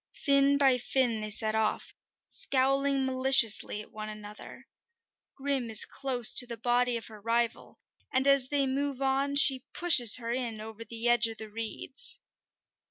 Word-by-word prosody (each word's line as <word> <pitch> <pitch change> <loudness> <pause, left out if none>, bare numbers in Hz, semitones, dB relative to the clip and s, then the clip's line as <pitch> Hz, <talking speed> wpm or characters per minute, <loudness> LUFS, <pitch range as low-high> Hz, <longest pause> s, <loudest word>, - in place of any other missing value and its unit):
Fin 280 -1 +1
by 265 -3 +2
fin 245 -3 -2
they 215 - -6
set 215 +1 -1
off, 220 -1 -3 0.3
scowling 275 +1 -1
maliciously 260 -5 +3
at - - -21
one 215 0 -9
another. 210 0 -13 0.7
Grim 270 -3 -3
is 220 -1 -1
close 250 -4 +2
to 245 - +5
the 235 -1 -8
body 245 +1 -1
of 230 - -9
her 215 -2 -14
rival, 230 +1 -3 0.3
and 260 -1 -1
as 275 -2 +3
they 280 0 -1
move 275 0 -4
on 275 +1 -2
she 270 -2 +5
pushes 270 -11 +6
her 230 -1 -5
in 235 -3 -5
over 220 +1 -10
the 230 +1 -4
edge 240 -1 +4
of 225 -1 -9
the 220 -1 -11
reeds. 225 +4 -4
245 Hz, 165 wpm, -27 LUFS, 225-270 Hz, 0.7 s, pushes